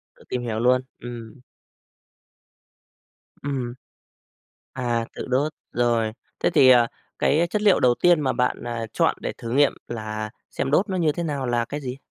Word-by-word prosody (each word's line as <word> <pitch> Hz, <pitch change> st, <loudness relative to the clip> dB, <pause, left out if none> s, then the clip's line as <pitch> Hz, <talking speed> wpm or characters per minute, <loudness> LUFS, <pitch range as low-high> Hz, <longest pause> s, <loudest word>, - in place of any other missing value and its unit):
Tự -, -, -19 dB
tìm 125 Hz, -, -2 dB
hiểu 110 Hz, -2 st, -2 dB
luôn. 125 Hz, +2 st, +4 dB, 0.2 s
Ừm. 120 Hz, -2 st, -8 dB, 2.1 s
Ừm. 130 Hz, -4 st, -3 dB, 1.0 s
À, 120 Hz, -2 st, -1 dB
tự -, -, -5 dB
đốt. 140 Hz, +4 st, +1 dB, 0.2 s
Rồi, 120 Hz, -2 st, +1 dB, 0.3 s
thế -, -, +2 dB
thì, 130 Hz, -, +6 dB
à, 120 Hz, -2 st, +7 dB, 0.3 s
cái 165 Hz, +4 st, +3 dB
chất 210 Hz, -, -1 dB
liệu 205 Hz, -3 st, +5 dB
đầu 125 Hz, -1 st, +4 dB
tiên 175 Hz, -3 st, +4 dB
mà 135 Hz, -3 st, +1 dB
bạn, 125 Hz, -1 st, 0 dB
à, 120 Hz, -1 st, -3 dB
chọn -, -, +2 dB
để -, -, -3 dB
thử 115 Hz, -, -6 dB
nghiệm 140 Hz, +2 st, +4 dB
là 110 Hz, -2 st, -4 dB, 0.2 s
xem 135 Hz, -, -2 dB
đốt 185 Hz, +8 st, +3 dB
nó 190 Hz, -, -1 dB
như 165 Hz, -4 st, +3 dB
thế 170 Hz, +3 st, -3 dB
nào 140 Hz, -4 st, -2 dB
là 120 Hz, -1 st, +1 dB
cái 145 Hz, +4 st, -5 dB
gì? 125 Hz, -1 st, -5 dB
125 Hz, 175 wpm, -24 LUFS, 120-145 Hz, 2.1 s, à